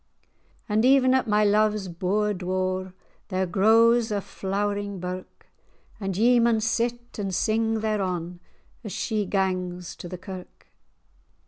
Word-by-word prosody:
And 215 0 +1
even 260 0 +5
at 260 -2 +2
my 210 0 +3
love's 210 -1 +2
bour 195 +4 0
door 185 0 -2 0.3
There 190 -1 -1
grows 225 +5 +4
a 205 - 0
flowering 200 0 -3
birk;[#] 180 +1 -7 0.5
And 195 -3 -3
ye 240 +3 +5
maun 230 -1 +3
sit 240 +1 -2
and 195 -3 -2
sing 225 +1 +1
thereon 180 -5 -2 0.4
As 210 - -6
she 215 -4 -1
gangs 180 -2 -2
to 175 - -8
the 180 - -6
kirk. 185 0 -10
205 Hz, 130 wpm, -25 LUFS, 185-225 Hz, 0.5 s, even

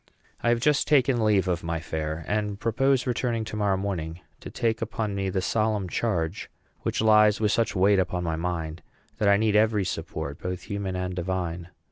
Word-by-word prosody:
I 120 - +1
have 120 0 +3
just 140 +2 +2
taken 130 -5 +3
leave 100 -3 +3
of 90 -1 -1
my 85 0 -2
fair, 80 0 -4
and 105 -1 -1
propose 130 +4 +2
returning 120 -2 -1
to 110 - -6
morrow 100 -2 +1
morning 85 -4 -3 0.2
to - - -8
take 110 -1 -1
upon 110 -2 -2
me 100 -1 -1
the 95 0 -1
solemn 110 -3 0
charge 90 -3 -2 0.3
which - - -1
lies 105 -1 +5
with 105 -2 +2
such 115 -1 +1
weight 95 +1 +4
upon 90 -1 -1
my 80 -2 -1
mind 80 -1 -3 0.4
that 105 -3 +3
I 100 - +6
need 110 0 +1
every 105 -2 +3
support, 70 -4 -4
both 90 -1 -4
human 100 -2 -4
and 90 0 -2
divine. 90 -1 -3
100 Hz, 190 wpm, -26 LUFS, 90-110 Hz, 0.4 s, I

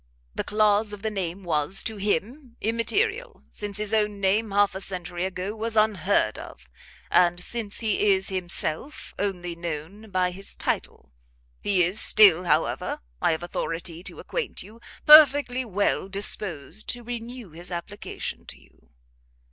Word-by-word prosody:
The - - -3
clause 210 0 +2
of 205 - -9
the 220 - -1
name 190 -1 -4
was, 165 +2 0
to 220 -1 -4
him, 230 - -2
immaterial; 415 - -1
since 205 -1 -4
his 210 0 -2
own 210 -2 +1
name 205 +3 +1
half 200 0 +3
a 190 - -6
century 180 -2 -3
ago 190 +2 -4
was 225 0 -3
unheard 200 - +2
of, 65 0 -11 0.4
and 175 -1 +4
since 215 +3 -3
he 210 -2 +2
is 190 0 +2
himself 185 - -1
only 180 -4 -2
known 170 +6 -6
by 185 -2 +1
his 195 +2 -8
title. - - -3 0.5
He 190 -3 +3
is 180 +5 +1
still, 185 -4 +6
however, 155 -1 0 0.2
I - - +3
have 160 - -4
authority 165 0 -4
to - - -6
acquaint 480 -4 -4
you, 220 +4 -15 0.2
perfectly 290 -4 +7
well 200 -3 -1
disposed 195 -3 -2
to 245 -1 -4
renew 240 -3 -7
his 170 +3 -7
application 175 +4 -6
to - - -11
you." - - -26
200 Hz, 150 wpm, -25 LUFS, 175-220 Hz, 0.5 s, perfectly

